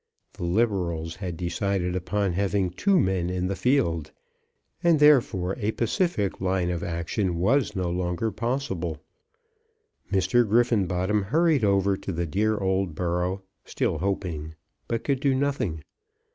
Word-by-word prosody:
The 85 - -5
Liberals 85 -5 0
had 90 -4 -5
decided 90 +1 -1
upon 95 +1 -1
having 95 0 0
two 190 - +2
men 95 - +1
in 90 0 -1
the 100 +1 -1
field, 105 - +1 0.7
and 170 -2 +5
therefore 115 -11 +4
a 110 0 -1
pacific 115 - -1
line 90 -1 0
of 85 -1 -3
action 85 +2 -2
was 110 +4 +2
no 95 -2 -1
longer 90 +5 -1
possible. 110 - -2 1.1
Mr. 95 +5 +3
Griffenbottom 105 -4 +2
hurried 155 - +2
over 100 -1 +3
to 95 - -5
the 85 0 -2
dear 105 +7 0
old 95 -3 0
borough, 90 +2 -1 0.2
still - - -1
hoping, 85 -5 -3 0.3
but 115 -1 -2
could 140 -2 0
do 135 -1 +2
nothing. 130 - -1
95 Hz, 135 wpm, -26 LUFS, 90-115 Hz, 1.1 s, and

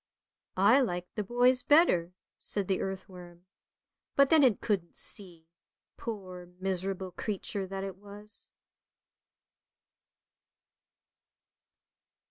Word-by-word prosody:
" - - -49 0.2
I 270 - +7
liked 180 -8 -2
the 210 - -2
boys 245 +4 +3
better," 245 - +4 0.2
said 200 -3 +1
the 190 - 0
earthworm, 180 -2 -7 0.7
but 275 -1 +5
then 320 -2 +7
it 245 -7 +4
couldn't 190 -6 -2
see, 175 -5 -7 0.5
poor, 185 -6 -7
miserable 190 0 -2
creature 195 0 -3
that 195 0 -5
it 195 -1 -6
was. 205 +2 -11
195 Hz, 95 wpm, -30 LUFS, 180-215 Hz, 0.7 s, I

